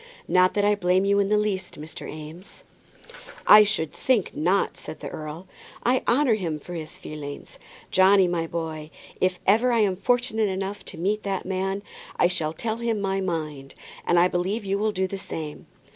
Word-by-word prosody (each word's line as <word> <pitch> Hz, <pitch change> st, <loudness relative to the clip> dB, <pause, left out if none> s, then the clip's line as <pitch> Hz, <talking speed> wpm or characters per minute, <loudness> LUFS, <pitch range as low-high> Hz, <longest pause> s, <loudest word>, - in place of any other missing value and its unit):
Not 185 Hz, 0 st, +4 dB
that 205 Hz, 0 st, +2 dB
I 205 Hz, -, +4 dB
blame 185 Hz, -1 st, +2 dB
you 200 Hz, 0 st, +3 dB
in 200 Hz, -1 st, +2 dB
the 210 Hz, -, +3 dB
least, 205 Hz, -6 st, -2 dB
Mr. 155 Hz, +1 st, -8 dB
Eames." 155 Hz, +5 st, -10 dB, 0.8 s
"I 210 Hz, 0 st, +9 dB
should 200 Hz, -8 st, -1 dB
think 245 Hz, -7 st, 0 dB
not," 185 Hz, +6 st, +1 dB
said 155 Hz, -, -9 dB
the -, -, -6 dB
earl. 155 Hz, +3 st, -7 dB, 0.4 s
"I 255 Hz, +1 st, +3 dB
honour 255 Hz, -1 st, +4 dB
him 175 Hz, -7 st, -2 dB
for 175 Hz, +4 st, -10 dB
his 155 Hz, -2 st, -6 dB
feeling. 145 Hz, -2 st, -7 dB, 0.5 s
Johnny, 190 Hz, 0 st, +6 dB
my 170 Hz, -2 st, -1 dB
boy, 160 Hz, -2 st, -5 dB, 0.3 s
if 185 Hz, -1 st, +1 dB
ever 230 Hz, +6 st, +4 dB
I 230 Hz, -2 st, +3 dB
am 205 Hz, -, +4 dB
unfortunate 225 Hz, +2 st, 0 dB
enough 195 Hz, +2 st, -4 dB
to 185 Hz, -, -8 dB
meet 205 Hz, +5 st, 0 dB
that 195 Hz, -2 st, -3 dB
man, 195 Hz, +1 st, -2 dB, 0.3 s
I -, -, +5 dB
shall 160 Hz, -4 st, -1 dB
tell 220 Hz, +6 st, -3 dB
him 230 Hz, -2 st, -1 dB
my 195 Hz, -1 st, -1 dB
mind, 155 Hz, -6 st, -4 dB, 0.3 s
and 175 Hz, -, +2 dB
I 175 Hz, +1 st, +6 dB
believe 190 Hz, +5 st, -2 dB
you 195 Hz, +1 st, 0 dB
will 215 Hz, +1 st, +1 dB
do 190 Hz, -2 st, 0 dB
the 195 Hz, +1 st, -5 dB
same." 155 Hz, -5 st, -7 dB
190 Hz, 190 wpm, -25 LUFS, 165-210 Hz, 0.8 s, I